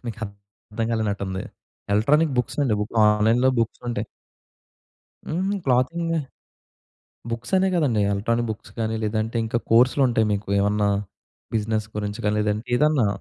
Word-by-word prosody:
మీకర్థం 105 0 -6
గాలేనట్టుంది. 100 -4 -2 0.5
Electronic 145 +9 +3
బుక్సండి, 125 -1 0
book 105 +2 -4
ఆన్‌లైన్‌లో 110 +4 +4
బుక్సుంటాయి. 115 -1 -2 1.2
హుహు. 185 +5 -1
క్లాతింగా 165 +6 +1 1.1
బుక్సనే 125 +12 +1
గాదండీ, 140 -11 +2
electronic 115 +4 0
books 110 - -7
గాని, 110 0 -1
లేదంటే 110 +2 -1
ఇంకా 115 +1 -1
కోర్సులుంటాయి 120 -1 +4
మీకూ, 100 0 -2
ఏమన్నా 105 +1 +2 0.7
బిజినెస్ 110 0 -1
గురించి 105 +1 -3
గాని, 105 0 +2
లేదంటే 105 +3 -1
ఏదన్నా. 150 -5 +3
115 Hz, 110 wpm, -23 LUFS, 105-125 Hz, 1.2 s, ఆన్‌లైన్‌లో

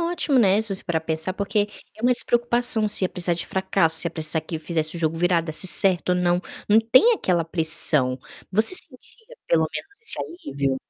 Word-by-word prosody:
ótimo, 335 -5 0
né, 200 -3 +3
se 215 -3 -1
você 190 - -2
parar 165 -2 -2
pensar. 160 +3 -3
Porque 205 +1 -2 0.3
é 220 - -13
uma 250 +1 +3
despreocupação, 240 -2 +1
se 205 - -1
ia - - 0
precisar 175 -1 -1
de 170 - -3
fracasso, 190 -4 0
se - - -2
ia - - -2
precisar 160 0 -1
que 160 +1 -7
fizesse 160 0 -2
o - - -6
jogo 160 0 -1
virar, 175 0 +1
desse 165 +2 -3
certo 185 -1 +2
ou - - +2
não, 175 0 0 0.3
não 215 +2 +5
tem 255 - +4
aquela 175 - -1
pressão. 155 -5 0 0.3
Você 220 - +6
sentia 440 - -3
pelo - - +2
menos 405 +1 -9
esse 450 - 0 0.3
alívio? 135 -1 -1
185 Hz, 205 wpm, -22 LUFS, 165-230 Hz, 0.3 s, Você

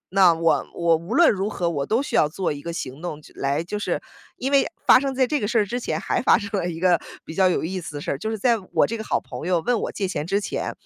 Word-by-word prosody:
那 190 -3 +7
我 165 0 +2
我 170 -1 +3
无 170 +8 -4
论 340 +2 +6
如 200 0 -1
何 180 -4 -2
我 140 -4 -2
都 230 +5 +1
需 - - -4
要 150 - +4
做 180 +4 -2
一 145 - -8
个 170 - -5
行 140 -4 -6
动 175 -4 -5
去 155 - -17
来 140 +3 -1
就 205 +5 -4
是 - - -1 0.4
因 265 +2 -2
为 280 -1 +4 0.2
发 - - +8
生 270 0 -2
在 260 0 +3
这 295 +4 0
个 205 - -1
事 235 +2 0
儿 210 - +3
之 240 +5 -3
前 - - -2
还 - - -1
发 - - +5
生 200 0 -6
了 175 - -2
一 165 -1 -6
个 180 -1 +3 0.2
比 - - -8
较 185 +2 +4
有 180 - 0
意 185 +3 -3
思 150 -3 -8
的 145 - -5
事 - - -3
儿， 140 - -2
就 220 - -3
是 220 - -2
在 230 +2 +2
我 160 - +4
这 230 - -3
个 220 - -5
好 - - 0
朋 165 - -8
友 180 -2 +2
问 240 +4 +1
我 - - -3
借 195 - -2
钱 160 -4 -3
之 195 +2 +1
前， 205 - -3
185 Hz, 330 characters per minute, -23 LUFS, 165-220 Hz, 0.4 s, 发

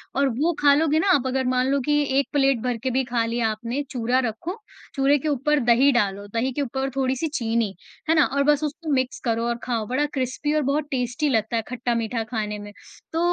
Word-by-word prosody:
और 280 +1 +3
वो 325 +4 +3
खा 285 -1 +6
लोगे 310 +1 +2
ना 390 - +1
आप 265 -2 0
अगर, 260 0 0
मान 255 0 +1
लो 280 +1 +2
की 295 +3 +1 0.2
एक 280 - 0
प्लेट 275 -3 +3
भर 250 -2 -1
के 260 - +1
भी 265 +2 +1
खा 235 -1 0
लिया 230 0 0
आपने 235 +5 -3
चूरा 245 -1 +1
रखो, 245 - -4 0.4
चूरे 275 +1 +3
के 310 - -4
ऊपर 295 +1 +1
दही 260 +4 +5
डालो, 205 -4 0
दही 230 +5 -1
के 290 - -2
ऊपर 270 0 -2
थोड़ी-सी 265 +3 0
चीनी, 230 -6 0 0.4
है 325 - +5
ना? 305 - +5
और 280 +1 0
बस 295 +1 0
उसको 305 +2 -4
मिक्स 260 -1 0
करो 230 0 0
और 235 0 -1
खाओ। 230 -3 -2
बड़ा 260 +5 +1
क्रिस्पी 265 +3 -1
और 305 - +2
बहुत 295 +1 -1
टेस्टी 255 +3 -1
लगता 220 -2 0
है 225 - +1
खट्टा-मीठा 235 -2 -2
खाने 215 -2 -4
में। 205 0 -9 0.4
तो 325 - 0
255 Hz, 225 wpm, -24 LUFS, 230-285 Hz, 0.4 s, खा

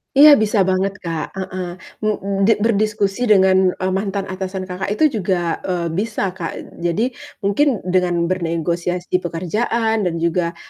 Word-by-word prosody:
Iya, 295 +2 +9
bisa 210 0 +1
banget, 190 +1 +1
Kak, 165 -1 -4
heeh, 185 -2 -5 0.2
m 215 - -5 0.4
di 225 - +5
berdiskusi 215 0 +1
dengan, 190 -2 +5
eee, 185 0 -2
mantan 195 +1 -1
atasan 190 0 -4
Kakak 185 +1 -5
itu 310 +2 +3
juga, 175 -3 -1
eee, 175 -3 -2
bisa, 200 +1 -1
Kak. 175 -2 -7
Jadi 185 +9 0 0.3
mungkin 230 +5 +1
dengan 180 -2 +1
bernegosiasi 175 0 -2
di 180 - +3
pekerjaan 210 +5 -1
dan 170 - -2
juga 170 0 0
185 Hz, 145 wpm, -19 LUFS, 175-205 Hz, 0.4 s, Iya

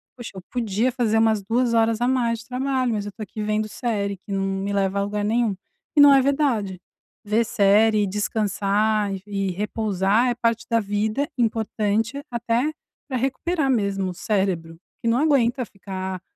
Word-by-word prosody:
"poxa, 240 -3 -8
eu 190 - -7
podia 230 0 0
fazer 235 -3 +1
umas 220 -2 +3
2 235 +3 +1
horas 225 0 +2
a 245 - +1
mais 240 -3 +1
de 230 - -12
trabalho 255 -1 0
mas 205 -1 -2
eu 205 - -6
tô 215 +2 -8
aqui 215 +1 -7
vendo 215 0 0
série 210 -3 -2
que 200 - -12
não 195 0 0
me 195 +1 -2
leva 200 0 0
a - - +1
lugar 205 0 -2
nenhum". 225 -1 +1 0.4
E - - +8
não 285 -1 +9
é 270 - +6
verdade. 255 - 0 0.5
Ver 215 +3 +2
série 215 -1 +3
e - - 0
descansar 210 +1 0
e 190 - -9
e 195 -2 -2
repousar 210 +2 0
é 240 - 0
parte 230 -1 0
da 230 -1 +3
vida, 215 +6 -1
importante, 225 +2 0
até 240 +4 0 0.4
pra 265 -3 -2
recuperar 275 +4 -1
mesmo 200 -5 0
o - - -7
cérebro, 180 -4 -2 0.2
porque - - -5
não 230 +1 +3
aguenta 260 -4 +2
ficar 190 -2 -6
220 Hz, 185 wpm, -23 LUFS, 200-240 Hz, 0.5 s, não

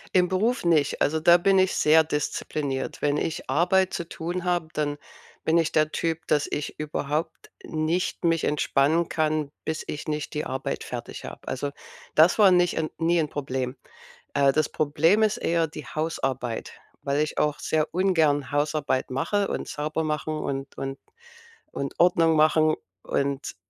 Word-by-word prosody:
Im 180 -1 +5
Beruf 205 +3 0
nicht, 160 -4 +2
also, 160 +1 +1
da 175 +1 +7
bin 195 +2 +3
ich 190 0 +3
sehr 160 +1 +5
diszipliniert. 150 -2 -3
Wenn 145 0 +2
ich 155 -2 -3
Arbeit 180 +6 +2
zu 170 - -3
tun 175 +2 -4
habe, 175 -3 0
dann 145 -1 -1 0.5
bin 160 +1 +3
ich 165 -2 +2
der 155 -1 +2
Typ, 165 -1 -2
dass 150 -1 +2
ich 150 - -4
überhaupt 150 +2 -3
nicht 160 +3 -1
mich 165 -1 +2
entspannen 150 +3 +2
kann, 155 -2 -1
bis 160 0 -3
ich 150 +1 -5
nicht 150 -1 -3
die 150 - -2
Arbeit 130 0 -3
fertig - - -7
habe. - - -10
Also, 140 +2 -2 0.4
das 160 +6 +5
war 200 -3 +7
nicht 175 -1 +3
'n 160 -1 -1
nie 170 +1 +2
'n 150 - -2
Problem. 130 -2 -3 0.6
Äh, 140 -1 +4
das 155 +1 +2
Problem 160 +8 +2
ist 215 - +2
eher 165 -1 +1
die 150 -1 -9
Hausarbeit, 135 -7 -3 0.3
weil 140 +2 0
ich 155 - -2
auch 150 -1 +1
sehr 155 0 0
ungern 160 -7 +2
Hausarbeit 145 -3 0
mache 200 +10 0
und - - -4
sauber 155 +2 -2
mache 155 0 -2
und 140 -3 -4
und 135 0 -5 0.7
und 140 -1 -4
Ordnung 165 -2 +4
machen 155 0 +4 0.3
und 140 0 -2
155 Hz, 165 wpm, -25 LUFS, 145-170 Hz, 0.7 s, da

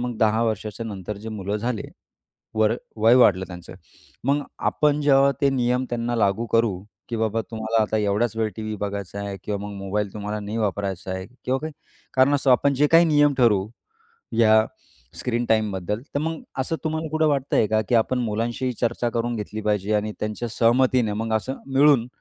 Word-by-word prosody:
मग 120 -1 -3
10 110 +1 +3
वर्षाच्या 110 0 -3
नंतर 100 -1 -6
जे 110 +2 -8
मुलं 105 -1 -3
झाले 115 0 -3 0.7
वर 110 0 +3 0.2
वय 115 +3 +5
वाढलं 95 -7 +5
त्यांचं, 90 -2 -10 0.5
मग 140 +3 +2 0.2
आपण 150 -1 +2
जेव्हा 140 -1 +5
ते 140 - +4
नियम 125 -1 +1
त्यांना 120 0 -2
लागू 105 +1 +1
करू, 110 -5 +1 0.3
की 115 - -2
बाबा 110 0 0
तुम्हाला 110 0 -1
आता 110 +1 0
एवढाच 105 +2 0
वेळ 110 -1 +1
टीव्ही 110 -1 -4
बघायचा 100 -1 -4
आहे 100 -1 -4
किंवा 105 -1 -2
मग 105 - -7
मोबाईल 100 +1 -2
तुम्हाला 105 0 -4
नाही 105 +2 -5
वापरायचा 100 -3 -2
आहे. 95 0 -4 0.2
किंवा 130 +1 +1
काही 155 0 -6 0.4
कारण 130 +2 +4
असं 140 -2 +3
आपण 140 +3 +4
जे 145 +2 +3
काही 165 +2 +6
नियम 145 -2 +4
ठरवू 105 -6 +3 0.7
या 110 -1 +5 0.5
स्क्रीन 120 -1 -1
टाईमबद्दल. 105 -2 0 0.2
तर - - +2
मग 160 +1 -2 0.2
असं 135 +5 -1
तुम्हाला 160 0 -2
कुठं 155 0 +2
वाटतंय 135 -6 +1
का, 110 +1 +2
की 120 - +4
आपण 120 +3 +2
मुलांशीही 120 +2 -1
चर्चा 120 0 0
करून 120 +1 -2
घेतली 110 0 -5
पाहिजे 105 0 0
आणि 105 +1 -1
त्यांच्या 105 +3 -3
सहमतीने 120 0 +2
मग 110 +1 -2
असं 130 +5 -5 0.2
मिळून, 135 -3 +5
115 Hz, 180 wpm, -23 LUFS, 105-125 Hz, 0.7 s, काही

